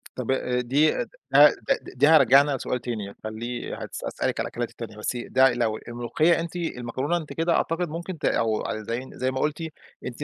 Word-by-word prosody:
طب 130 0 -2
آآ 125 -1 0
دي 140 +6 +3
د - - -2 0.3
ده - - +9 0.3
د - - -8
دي 145 - +7
هارجعنا 140 -2 +6
لسؤال 125 0 -2
تاني 110 -5 -5
خليه 115 +3 -5
هاس - - -7
هاسألِك - - -2
على - - -1
الأكلات - - -4
التانية، 105 - -9
بس 105 - -3
ي 120 - -5
ده 130 -1 +5
لو 115 -3 0
الملوخية 120 +9 +1
أنتِ 170 +1 -5
المكرونة 140 -1 -2
أنتِ 150 -4 -7
كده 165 +2 +1
أعتقد 165 +1 0
ممكن 170 +3 -5
ت - - -5
أو 110 -2 +1 0.2
زي 120 +3 -3
زي 130 +1 -1
ما 130 - -3
قُلتِ، 150 +3 -1 0.4
أنتِ 125 +4 -5
130 Hz, 200 wpm, -25 LUFS, 120-155 Hz, 0.4 s, ده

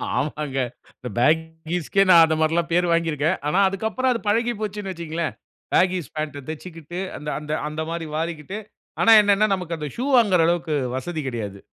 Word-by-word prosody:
ஆமாங்க. 145 -1 -2 0.4
இந்த 125 - -6
பேகீஸ்‌க்கே 160 +5 +1
நான் 170 -2 +9
அந்த 160 0 0
மாரில்லாம் 165 +2 +1
பேர் 175 +1 +3
வாங்கிருக்கேன். 165 +1 +1
ஆனா 180 +6 +2
அதுக்கப்புறம் 220 +6 -1
அது 235 - -1
பழகி 230 +3 +2
போச்சுன்னு 205 -2 -4
வச்சுக்கோங்களேன். 165 -1 -4 0.4
பேகீஸ்‌ 180 -6 +2
பேன்ட்‌ட 150 -2 -4
தைச்சுக்கிட்டு, 165 +1 -7 0.2
அந்த 150 +1 -6
அந்த 150 0 -7 0.2
அந்த 155 +1 -4
மாதிரி 165 -1 -4
வாரிக்கிட்டு 165 +4 -4 0.4
ஆனா 225 - +6
என்னன்னா 205 0 +3
நமக்கு 180 -3 -3
அந்த 150 -1 -4
ஷூ 245 - -3
வாங்குற 200 -7 +4
அளவுக்கு 170 -2 0 0.2
வசதி 160 +3 -4
கிடையாது. 105 -6 -5
165 Hz, 160 wpm, -23 LUFS, 155-185 Hz, 0.4 s, நான்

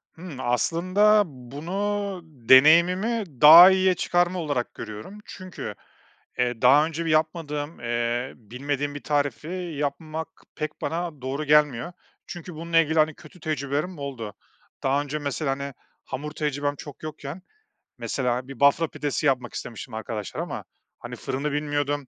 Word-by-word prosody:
Hımm, 165 -6 -9
aslında 185 - +3
bunu 180 +9 -4
deneyimimi 165 - +5 0.2
daha 165 +5 +11
iyiye 190 0 +3
çıkarma 175 +2 +1
olarak 145 -7 -2
görüyorum 110 - -8
çünkü, 185 -2 -8 0.6
eee, 120 -2 0
daha 145 +3 +6
önce 165 +1 -4
bir - - -1
yapmadığım, 155 -1 -1
eee, 120 +1 -1
bilmediğim 140 +5 -4
bir 145 - -7
tarifi 145 -3 -1 0.3
yapmak 155 +3 -3 0.3
pek 155 0 -5
bana 165 -4 -3
doğru 135 +3 -3
gelmiyor. 150 +1 +3 0.3
Çünkü 175 -1 -8
bununla 165 +1 -1
ilgili, 160 0 +2
hani, 155 +1 +3
kötü 180 - -16
tecrübelerim 150 +3 -2
oldu. 120 -7 -6 0.5
Daha 135 +2 +2
önce, 145 +1 -4
mesela, 145 0 -2
hani, 140 0 -4 0.3
hamur 150 +3 -5
tecrübem 145 -1 -2
çok 145 +1 -11
yokken, 155 +2 -7 0.6
mesela, 125 -1 -2
bir 135 -3 -10
Bafra 140 +3 +4
pidesi 145 0 -3
yapmak 125 -4 +1
istemiştim 115 +1 -7
arkadaşlara 110 -2 -4
ama, - - -6 0.3
hani, - - -7
fırını 140 +3 -3
bilmiyordum. 145 -1 -1
145 Hz, 135 wpm, -25 LUFS, 135-165 Hz, 0.6 s, daha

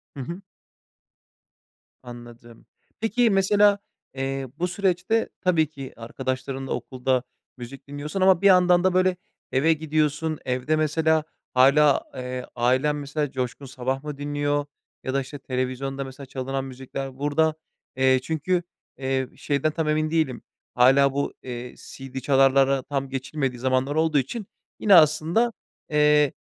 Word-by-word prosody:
Hı - - -8
hı. 170 +8 -7 1.6
Anladım. 120 -1 -12 0.3
Peki, 225 +2 +2
mesela, 200 +1 +4 0.3
eee, 135 0 -3
bu 180 - +1
süreçte 195 +4 0
tabii 165 -4 +2
ki, 135 -4 -9
arkadaşlarınla 130 +3 -4
okulda, 130 0 -1 0.3
müzik 135 +3 -10
dinliyorsun 150 +6 -5
ama 185 -2 +5
bir 200 - +5
yandan 180 -1 +5
da 185 -1 +3
böyle, 185 0 +2 0.3
eve 155 +5 +3
gidiyorsun. 155 0 -1
Evde 130 +4 0
mesela 155 0 +2 0.3
hâlâ, 140 +3 +5
eee, 125 0 -5
ailen 130 +5 +2
mesela 145 0 -3
Coşkun 130 +1 -4
Sabah 130 +1 -3
mı 150 -2 -6
dinliyor? 145 0 -1 0.4
Ya 130 - -3
da 140 - +1
işte 135 +2 -9
televizyonda 130 +1 -3
mesela 135 +1 -9
çalınan 135 +1 -4
müzikler 130 0 -7
burada, 155 +2 +1 0.4
eee, 130 0 +4
çünkü, 175 +4 -1 0.3
eee, 130 -1 -1
şeyden 145 +1 0
tam 160 0 -2
emin 155 0 +1
değilim. 155 -7 0 0.3
Hâlâ 135 +2 +5
bu, 140 +1 -2
eee, 125 -1 -7
CD 135 0 -8
çalarlara 135 0 +3
tam 135 -2 -3
geçilmediği 135 -1 -3
zamanlar 130 +3 0
olduğu 160 -2 +2
için 205 - -2 0.3
yine, 200 -3 +6
aslında, 165 +9 +4 0.4
eee, 150 -1 +4
140 Hz, 135 wpm, -24 LUFS, 130-160 Hz, 1.6 s, yine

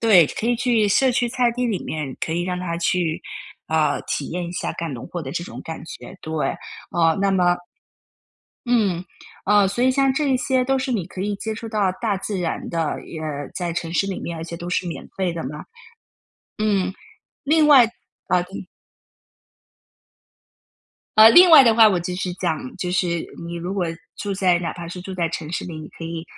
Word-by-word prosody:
对， 200 -8 +6
可 220 - -4
以 240 - +3
去 235 -3 +2
社 260 +6 +4
区 240 0 +1
菜 245 -1 +2
地 250 +1 -1
里 215 -6 -2
面 150 -4 -4
可 160 - -2
以 175 +1 0
让 180 0 -2
他 175 -2 -3
去， 170 -1 0 0.4
啊， 160 -1 +1
体 145 - -3
验 175 +1 -3
一 170 - -6
下 - - -3
干 165 -3 -4
农 120 - -7
活 175 - -5
的 135 - -6
这 170 - -2
种 - - -9
感 160 -1 -6
觉， 185 +3 -10
对， 155 -3 -2 0.4
啊， 165 -1 +3
那 200 0 +2
么 180 -2 +3 1.1
嗯， 205 -8 +1 0.4
哦， 205 0 +5
所 200 +5 -1
以 260 - +5
像 270 0 +3
这 285 +1 0
一 265 - +3
些 255 0 +1
都 270 +1 +1
是 260 -1 -2
你 195 -7 -1
可 185 - -8
以 205 +1 -1
接 220 +2 -4
触 225 +1 -7
到 210 -3 +1
大 215 -4 0
自 195 +1 -4
然 175 -2 -3
的， 165 -3 -2
也 160 - -7 0.3
在 175 -2 -2
城 165 0 -4
市 195 - +1
里 195 - -3
面， 170 - -5
而 160 - -5
且 170 0 -7
都 175 +1 -7
是 180 0 -1
免 170 - -6
费 185 -2 0
的 165 -1 -4
嘛。 150 +3 -6 0.9
嗯， 205 -3 +1 0.5
另 305 +1 +4
外 275 -5 +8 0.4
啊 180 - +3
嗯 185 +1 -8 2.5
呃， 215 +1 +10
另 350 +9 +8
外 300 -4 +10
的 230 -2 +5
话 220 -1 +8
我 190 -4 +1
就 180 +1 -4
是 180 0 -3
讲， 160 -8 -3
就 180 - -3
是 175 -2 0 0.2
你 170 - -6
如 175 +3 -4
果 190 -3 0 0.3
住 205 - -3
在 185 -2 +3
哪 170 -1 -3
怕 170 -1 -8
是 180 +1 -7
住 190 - -7
在 170 -2 0
城 160 -1 -5
市 - - -2
里， 170 -3 -7
你 155 - -8
可 165 - -10
以 165 0 -5
185 Hz, 225 characters per minute, -22 LUFS, 170-220 Hz, 2.5 s, 呃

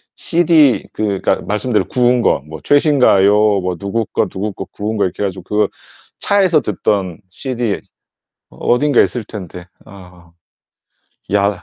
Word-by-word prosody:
CD 165 -6 +3
그 100 -3 -2
그러니까 - - +1
말씀대로 105 +2 -1
구운 125 -1 +2
거. 70 - +1
뭐 80 -1 -9
최신가요, 130 -9 +4 0.3
뭐 90 0 -2
누구 105 +4 -2
거, - - -1
누구 100 +2 -4
거 95 - -7
구운 110 +1 -5
거 100 - +2
이렇게 95 +3 -4
해 - - +1
가지고 95 -2 -7
그 105 +2 0 0.5
차에서 185 -7 +3
듣던 100 -4 -2
CD 120 -4 -3 0.7
어딘가 140 +2 +1
있을 120 -4 0
텐데. 90 -4 -9 0.2
아. 90 -3 -15 1.0
야. 100 -2 +1
105 Hz, 275 characters per minute, -16 LUFS, 95-125 Hz, 1.0 s, 최신가요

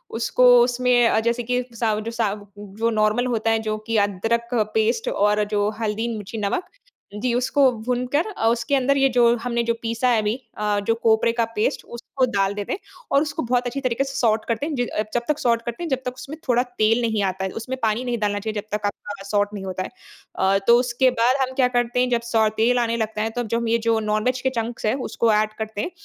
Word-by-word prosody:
उसको 240 +2 +2 0.2
उसमें 245 -2 +3
जैसे 235 +1 0
कि 250 +2 0
सा 225 -1 +1
जो 225 +2 -5
सा 225 -3 0 0.3
जो 205 +3 -2
नॉर्मल 215 +2 +1
होता 225 -2 0
है 225 - +2
जो 215 0 -1
कि 230 -1 +1
अदरक 225 +4 -1 0.3
पेस्ट 450 - +1
और 210 - +2
जो 205 0 +1
हल्दी 220 +1 -1
मिर्ची 210 +2 -7
नमक, 205 - -1 0.5
जी, 235 +3 -1
उसको 260 +2 +3
भूनकर 250 +5 0
अ, 225 - +1
उसके 230 +4 +1
अंदर 275 +1 +2
ये 270 0 +4
जो 240 -1 +4
हमने 235 -1 0
जो 235 0 +1
पीसा 230 +2 0
है 230 -3 +3
अभी 210 +2 0 0.2
अ, 210 -1 0
जो 225 - +3
कोपरे 225 0 +4
का 230 -1 +1
पेस्ट 210 - 0
उसको 240 +2 -2
डाल 195 0 +1
देते 205 -1 -4
हैं - - -4 0.3
और 275 - +4
उसको 310 +1 -2
बहुत 245 +1 0
अच्छी 270 +3 -4
तरीके 255 0 0
से 270 0 -6
सॉट 220 -2 +1
करते 230 +4 -1
हैं। 305 -1 -3
जि 245 -2 0 0.3
जब 240 - +1
तक 300 -1 0
सॉट 235 -1 +2
करते 235 +8 -5
हैं 335 - -3
जब 265 - +1
तक 250 - -2
उसमें 275 +4 -9
थोड़ा 245 -1 +3
तेल 235 -2 +1
नहीं 220 -3 0
आता 190 +1 -5
है। - - -2
उसमें 260 +3 -5
पानी 220 +2 0
नहीं 245 -1 -1
डालना 205 -1 0
चाहिए 220 +1 -4
जब 210 - -28
तक 210 - -6
आपका 205 0 -5
सॉट 205 0 +1
नहीं 200 -2 -6
होता 185 0 -3
है। - - -7 0.5
अ, 190 +1 +2
तो 235 0 +7
उसके 250 +1 +2
बाद 245 +3 +4
हम 260 0 -1
क्या 260 -2 +4
करते 240 0 0
हैं 250 0 +2
जब 240 -1 +1
सौ 220 -1 +4
तेल 245 +3 +3
आने 230 -1 0
लगता 220 -1 -2
है 220 - 0
तो 245 +2 -3
अब 235 - -4
जो 230 - 0
हम 235 - -3
ये 230 +1 +3
जो 225 -1 +3
नॉन 215 0 -1
वेज 255 0 0
के 260 - +1
चंक्स 230 +1 -4
है 215 - +2 0.2
उसको 230 -2 +2
ऐड 215 0 +1
करते 220 -1 -3
हैं 355 - -4
230 Hz, 245 wpm, -22 LUFS, 215-250 Hz, 0.5 s, तो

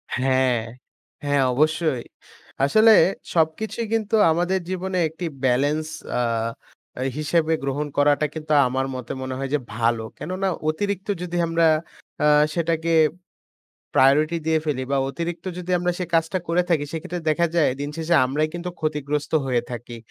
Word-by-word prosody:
হ্যা, 130 +1 0 0.9
হ্যা, 145 0 0 0.2
অবশ্যই 155 -1 +1 0.6
আসলে 220 +10 +6 0.4
সবকিছুই 175 +8 0
কিন্তু 220 -1 +1 0.2
আমাদের 175 +3 +1
জীবনে 185 0 -2
একটি 165 +3 -6 0.2
ব্যালেন্স 145 +5 +2 0.3
আ - - +2 1.0
হিসেবে 160 +1 +1
গ্রহণ 140 +2 -2
করাটা 145 +1 +3
কিন্তু 155 -1 -2
আমার 130 +1 -1
মতে 125 -2 -6
মনে 130 0 -4
হয় 135 0 -3
যে 150 - +3 0.2
ভালো। 115 0 +1
কেননা 185 +3 -3 0.2
অতিরিক্ত 200 +4 -2
যদি 175 -1 -3
আমরা 165 0 +3 0.6
আ - - +5 0.3
সেটাকে 165 0 0 1.0
প্রায়োরিটি 150 +5 +4
দিয়ে 160 0 +3
ফেলি 140 -4 -1
বা 140 - +2
অতিরিক্ত 170 +5 -5
যদি 180 0 -5
আমরা 180 0 0
সে 180 - -1
কাজটা 165 +3 +2
করে 170 +2 +2
থাকি। 160 -4 +2
সেক্ষেত্রে 170 +2 -5
দেখা 170 +3 +2
যায় 165 -4 +4
দিনশেষে 160 +4 -1
আমরাই 145 +4 0
কিন্তু 175 +1 -4
ক্ষতিগ্রস্ত 150 -1 -2
হয়ে 125 -3 +1
থাকি। 120 0 -7
155 Hz, 140 wpm, -23 LUFS, 145-175 Hz, 1.0 s, আসলে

